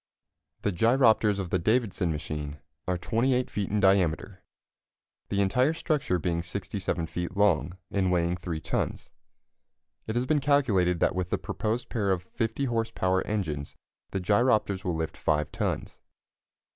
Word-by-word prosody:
The 105 - +1
gyropters 110 0 +4
of 95 -3 -4
the 90 - +2
Davidson 105 -3 +1
machine 75 -1 -4 0.3
are 90 -1 +1
28 125 +7 +1
feet 100 -2 -2
in 105 - +1
diameter, 95 -1 +2 0.9
the 100 0 +1
entire 125 +10 +3
structure 155 - 0
being 85 0 -1
67 90 -1 -3
feet 90 +3 -5
long, 95 -3 +2
and 95 -2 +1
weighing 85 -1 +1
3 90 -3 -4
tons. - - -3 1.0
It 110 - -3
has 120 +1 +1
been 150 +1 +2
calculated 105 - +2
that - - +3
with 90 -1 -2
the - - +1
proposed 115 +3 -3
pair 105 -4 -1
of 90 -2 +1
50 115 +8 -2
horse 115 -3 0
power 95 0 +1
engines 80 -9 -3 0.3
the 95 - -2
gyropters 100 0 +2
will 90 -2 -1
lift 80 -1 -3
5 75 -1 0
tons. - - -3
95 Hz, 150 wpm, -28 LUFS, 90-115 Hz, 1.0 s, gyropters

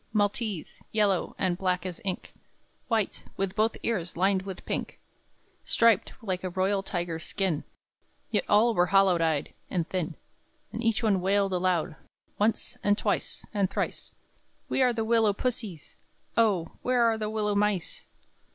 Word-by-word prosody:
Maltese, 205 -3 -1
yellow, 205 -4 +1
and 180 -1 0
black 180 -1 0
as 180 -2 -5
ink; 190 -2 -3 0.5
White, 220 -4 0
with 195 -1 -1
both 220 +1 +2
ears 185 -8 -2
lined 190 +1 +3
with 190 -1 -8
pink; - - -3 0.6
Striped, 230 -4 +3
like 185 -3 -2
a 185 - -1
royal 190 +2 +1
tiger's 175 -4 -3
skin; 190 -7 -1 0.7
Yet 210 - +2
all 225 +3 +5
were 180 -3 +3
hollow 195 -2 +4
eyed, 160 -3 0 0.2
and 175 -3 -1
thin; 180 -5 -2 0.6
And 230 - -4
each 225 0 +1
one 200 -4 +3
wailed 195 +1 +2
aloud, 180 -3 0 0.4
Once, 215 +1 0
and 205 0 +3
twice, - - -2
and 200 -3 +1
thrice: - - -3 0.6
"We - - 0
are 250 -1 +5
the 225 -2 -1
willow 225 -2 +4
pussies; 215 - -4 0.4
O, 200 -8 +2
where 250 -1 +2
are 225 -1 +3
the 215 -1 -2
willow 210 -1 0
mice!" 200 -4 0
195 Hz, 150 wpm, -28 LUFS, 180-220 Hz, 0.7 s, all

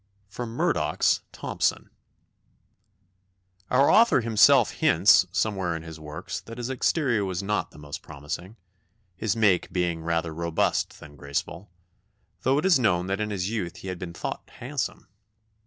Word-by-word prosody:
[Sidenote: 115 +1 -6
Murdoch's - - +1
Thomson.] - - -2 1.8
"Our 135 +3 +4
author 230 - +5
himself 115 +3 +5
hints, 95 - +5
somewhere 95 -3 -1
in 80 - -6
his 80 -1 -9
works, 80 +5 -6
that 115 +5 -10
his 120 +1 -3
exterior 130 -4 +1
was 95 0 -3
not 105 +1 -1
the - - -17
most 75 -1 -8
promising 80 +7 -7 0.6
his 105 +1 -1
make 105 -6 +2
being 85 -2 -1
rather 80 0 -1
robust 85 0 -1
than 75 -1 -13
graceful, 85 +7 -4 0.7
though 135 +2 +2
it 150 - 0
is 185 -7 +5
known 90 -7 +2
that 95 +2 -2
in 105 - -1
his 100 -1 -2
youth 95 -7 -3
he 95 - -8
had 90 -1 -5
been 90 -2 -6
thought - - -5
handsome. - - -4
95 Hz, 150 wpm, -26 LUFS, 85-115 Hz, 1.8 s, author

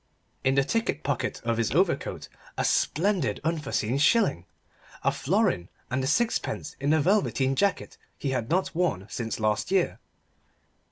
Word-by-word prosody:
In 135 0 +2
the 135 - +4
ticket 160 -3 -1
pocket 140 -3 -2
of 115 -1 0
his 115 -2 +1
overcoat 170 -3 0 0.3
a - - 0
splendid 175 - +1
unforeseen 140 -6 -1
shilling 150 - +3 0.6
a - - +3
florin 175 - 0 0.2
and 130 +1 0
a - - 0
sixpence 230 - 0
in 140 +1 -1
the 155 +1 +4
velveteen 145 -6 +2
jacket 200 +5 0 0.2
he 140 - -2
had 125 -3 -2
not 185 +3 +1
worn 165 - 0
since 115 -2 -3
last 110 0 0
year. 190 -2 +1
140 Hz, 150 wpm, -27 LUFS, 120-185 Hz, 0.6 s, the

